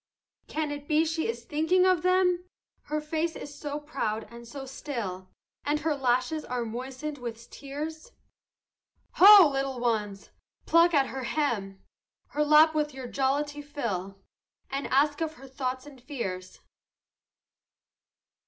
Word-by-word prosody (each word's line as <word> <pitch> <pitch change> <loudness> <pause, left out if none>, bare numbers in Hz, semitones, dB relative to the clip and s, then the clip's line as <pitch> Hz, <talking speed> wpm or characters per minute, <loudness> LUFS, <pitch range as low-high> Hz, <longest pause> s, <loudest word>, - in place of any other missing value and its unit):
Can 310 -1 -2
it 290 0 -7
be 310 0 +3
she 320 0 -1
is 235 +1 -4
thinking 320 +6 +2
of 370 -3 +3
them, 365 0 +2 0.4
Her 305 +1 -2
face 320 +2 -2
is 290 - -8
so 290 0 -5
proud 245 -8 -3
and 235 0 -11
so 270 +3 -7
still, 230 -9 -5 0.3
And 300 +1 0
her 315 -2 0
lashes 255 +3 0
are 245 -1 -3
moistened 260 +5 -5
with 235 -1 -8
tears? 310 - -7 1.1
Ho, 395 -2 +10
little 270 -2 -2
ones! 210 -4 -2 0.3
pluck 335 0 +5
at 275 -1 +4
her 265 -1 -5
hem, 220 -10 -2 0.5
Her 300 - 0
lap 305 +1 +6
with 300 -2 -1
your 260 -1 -6
jollity 285 +3 -1
fill, 205 - -4 0.5
And 275 +1 -2
ask 290 +3 +2
of 315 -1 -2
her 270 -1 -13
thoughts 260 0 -4
and 285 -3 -13
her 245 - -26
fears. 185 -10 -5
285 Hz, 145 wpm, -28 LUFS, 245-310 Hz, 1.1 s, Ho